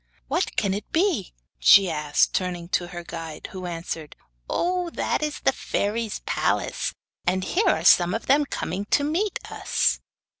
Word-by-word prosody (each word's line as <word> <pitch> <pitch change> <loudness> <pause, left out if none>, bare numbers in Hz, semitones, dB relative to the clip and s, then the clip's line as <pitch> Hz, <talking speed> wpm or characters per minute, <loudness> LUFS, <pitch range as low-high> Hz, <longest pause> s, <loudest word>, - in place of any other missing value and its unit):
'What - - -1
can 195 - +1
it 205 +1 -6
be?' 330 - +1 0.3
she 190 - +7
asked, 150 -3 +1
turning 175 -2 -2
to 175 -1 0
her 175 -1 -7
guide; 165 -2 -7
who 185 -1 -6
answered: 165 -2 -5 0.3
'Oh, 360 0 0
that - - -1
is 300 -1 -3
the - - +4
fairies' 215 +1 -2
palace, - - 0 0.4
and 185 +1 +1
here 375 - +2
are - - +1
some 175 +2 +6
of 225 - -4
them 285 +2 +4
coming 195 -6 -3
to 285 - +2
meet 350 +8 0
us. - - +1
190 Hz, 160 wpm, -25 LUFS, 175-290 Hz, 0.4 s, she